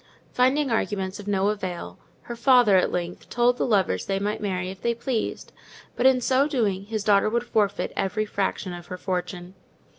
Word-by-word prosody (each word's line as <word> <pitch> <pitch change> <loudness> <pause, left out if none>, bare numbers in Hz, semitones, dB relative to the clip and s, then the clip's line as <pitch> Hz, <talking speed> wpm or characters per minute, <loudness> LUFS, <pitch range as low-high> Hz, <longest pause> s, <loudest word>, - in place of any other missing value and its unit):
Finding 260 +2 +2
arguments 195 -4 -1
of 205 - -9
no 200 0 +1
avail, 180 - -5 0.2
her 235 - -7
father, 240 -4 +5
at 185 - +3
length, 175 0 -4
told 245 0 +2
the - - +1
lovers 190 - +1
they 195 - 0
might 205 +2 -2
marry 185 -2 -2
if 190 - -12
they 235 0 0
pleased; 235 -1 -3 0.4
but, 250 - +3
in 260 -1 +4
so 265 +3 +2
doing, 205 -9 -1
his 215 -1 -3
daughter 205 0 +4
would 235 +2 0
forfeit 210 -4 0
every 210 +3 -1
fraction 195 -2 -2
of 175 0 -9
her 180 - -6
fortune. 180 -1 -4
205 Hz, 185 wpm, -25 LUFS, 185-235 Hz, 0.4 s, father